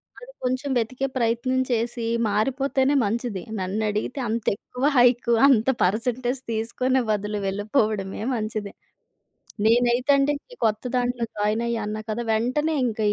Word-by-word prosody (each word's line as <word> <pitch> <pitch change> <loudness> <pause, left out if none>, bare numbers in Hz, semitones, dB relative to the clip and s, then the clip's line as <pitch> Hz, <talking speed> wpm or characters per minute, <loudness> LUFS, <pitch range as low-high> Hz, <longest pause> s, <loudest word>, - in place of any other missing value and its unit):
వాళ్లు - - -13
కొంచెం 255 +3 -1
వెతికే 255 +4 -1
ప్రయత్నం 235 +2 +1
చేసి 235 0 -1 0.2
మారిపోతేనే 265 +5 +1
మంచిది. 215 -3 -2 0.2
నన్ను 190 +4 -2
అడిగితే 210 +6 -3
అంత 225 0 -2
ఎక్కువ 250 +4 -8
హైక్, 245 -1 +4 0.2
అంత 255 -3 +4
పర్సెంటేజ్ 245 +6 0
తీసుకొనే 250 +4 0
బదులు 210 0 -1
వెళ్ళిపోవడమే 205 -1 -1
మంచిది. 215 -2 -4 0.9
నేనైతే 240 +3 +3
అండి 275 +1 +2 0.2
ఈ - - -9
కొత్త 215 -1 +1
దాంట్లో 245 -1 0
జాయిన్ 210 +2 0
అయ్యా 235 -1 -1
అన్నా 215 +1 -3
కదా! 225 +3 -2
వెంటనే 255 +8 +1
ఇంకా 220 -2 -2
235 Hz, 135 wpm, -24 LUFS, 215-255 Hz, 0.9 s, హైక్